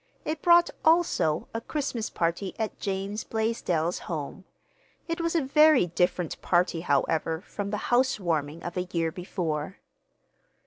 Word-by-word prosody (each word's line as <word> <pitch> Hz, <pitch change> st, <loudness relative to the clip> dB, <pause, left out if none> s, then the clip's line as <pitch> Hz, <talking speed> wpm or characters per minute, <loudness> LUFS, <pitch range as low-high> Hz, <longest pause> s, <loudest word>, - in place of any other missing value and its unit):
It 310 Hz, -1 st, -3 dB
brought, 345 Hz, 0 st, +5 dB
also, 320 Hz, -, +2 dB
a 225 Hz, -, -3 dB
Christmas 245 Hz, -5 st, -3 dB
party 170 Hz, +3 st, -2 dB
at 220 Hz, -2 st, -3 dB
James 195 Hz, +2 st, -3 dB
Blaisdell's 185 Hz, -7 st, -1 dB
home. 165 Hz, +3 st, -5 dB, 0.6 s
It 335 Hz, 0 st, -2 dB
was 335 Hz, 0 st, -1 dB
a 325 Hz, -, +2 dB
very 300 Hz, -, +5 dB
different 180 Hz, 0 st, -1 dB
party, 175 Hz, -2 st, +1 dB
however, 160 Hz, +2 st, 0 dB
from 205 Hz, 0 st, -5 dB
the 210 Hz, -, -2 dB, 0.2 s
housewarming 170 Hz, -, +1 dB
of 175 Hz, -, -5 dB
a 180 Hz, 0 st, -1 dB
year 165 Hz, -2 st, 0 dB
before. 175 Hz, -2 st, -4 dB
190 Hz, 135 wpm, -27 LUFS, 165-250 Hz, 0.6 s, brought